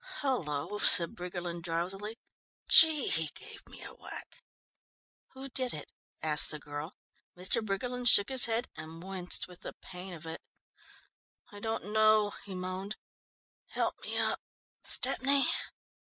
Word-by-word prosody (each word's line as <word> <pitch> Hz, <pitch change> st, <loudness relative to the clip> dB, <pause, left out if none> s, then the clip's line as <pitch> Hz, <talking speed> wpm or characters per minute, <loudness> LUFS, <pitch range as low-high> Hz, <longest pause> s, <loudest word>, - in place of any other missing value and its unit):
"Hullo," 205 Hz, -, -2 dB
said 170 Hz, -5 st, +7 dB
Briggerland 175 Hz, -1 st, -5 dB
drowsily, 190 Hz, +6 st, -3 dB, 0.5 s
"Gee, 315 Hz, -3 st, +7 dB
he 160 Hz, -1 st, 0 dB
gave -, -, -12 dB
me -, -, -12 dB
a -, -, -10 dB
whack!" -, -, -11 dB, 0.9 s
"Who 265 Hz, +1 st, -8 dB
did 255 Hz, -4 st, -1 dB
it?" 150 Hz, -, -9 dB, 0.3 s
asked 150 Hz, -2 st, +4 dB
the 155 Hz, -, 0 dB
girl. 150 Hz, +3 st, -7 dB, 0.4 s
Mr. 185 Hz, +5 st, +1 dB
Briggerland 245 Hz, +5 st, -2 dB
shook 200 Hz, -3 st, +7 dB
his 260 Hz, -2 st, +3 dB
head 230 Hz, +1 st, -1 dB
and 160 Hz, +1 st, -9 dB
winced 185 Hz, -1 st, -2 dB
with 180 Hz, -1 st, -14 dB
the -, -, -7 dB
pain 180 Hz, 0 st, -10 dB
of 165 Hz, 0 st, -11 dB
it. 160 Hz, 0 st, -7 dB, 1.1 s
"I 205 Hz, -, -10 dB
don't 220 Hz, -1 st, -4 dB
know," 215 Hz, -1 st, +4 dB
he 195 Hz, -2 st, -7 dB
moaned. 185 Hz, +3 st, -5 dB, 0.7 s
"Help -, -, -1 dB
me -, -, -4 dB
up, -, -, +1 dB, 0.4 s
Stepney." 275 Hz, +1 st, +2 dB
190 Hz, 140 wpm, -31 LUFS, 170-225 Hz, 1.1 s, said